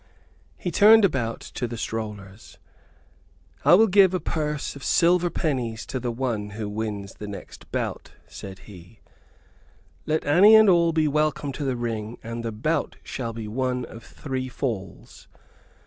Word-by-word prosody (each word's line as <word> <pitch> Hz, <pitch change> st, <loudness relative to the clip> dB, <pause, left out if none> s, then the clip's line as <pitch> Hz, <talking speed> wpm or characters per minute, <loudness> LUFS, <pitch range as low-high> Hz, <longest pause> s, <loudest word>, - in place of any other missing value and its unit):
He 175 Hz, -, -4 dB
turned 215 Hz, +3 st, +7 dB
about 120 Hz, -10 st, -1 dB
to 120 Hz, -, -2 dB
the 120 Hz, 0 st, -6 dB
strollers: 105 Hz, -3 st, -6 dB, 1.1 s
"I -, -, +7 dB
will 220 Hz, +4 st, +6 dB
give 190 Hz, -2 st, +5 dB
a -, -, 0 dB
purse 150 Hz, -2 st, -3 dB
of 140 Hz, -, -10 dB
silver 175 Hz, +1 st, +3 dB
pennies 125 Hz, -10 st, -2 dB
to 130 Hz, -, -4 dB
the 120 Hz, 0 st, -3 dB
one 115 Hz, -4 st, -3 dB
who 110 Hz, -2 st, -3 dB
wins 105 Hz, -2 st, -4 dB
the 105 Hz, -, -8 dB
next 100 Hz, -1 st, -10 dB
bout," -, -, -3 dB, 0.2 s
said 95 Hz, -1 st, -10 dB
he. 95 Hz, +1 st, -14 dB, 1.1 s
"Let 155 Hz, 0 st, 0 dB
any 190 Hz, +9 st, +7 dB
and 220 Hz, -1 st, +7 dB
all 170 Hz, -1 st, +4 dB
be 160 Hz, -1 st, +2 dB
welcome 150 Hz, -1 st, 0 dB
to 145 Hz, -, -5 dB
the 135 Hz, -2 st, -1 dB
ring, 115 Hz, -1 st, -4 dB
and 115 Hz, +1 st, -5 dB
the 115 Hz, -, -3 dB
bout 130 Hz, +10 st, -1 dB
shall 115 Hz, -3 st, -4 dB
be 110 Hz, -1 st, -7 dB
one 125 Hz, +2 st, -2 dB
of 115 Hz, -, -12 dB
three 130 Hz, -2 st, -5 dB
falls. 110 Hz, -9 st, -6 dB
125 Hz, 160 wpm, -24 LUFS, 110-155 Hz, 1.1 s, turned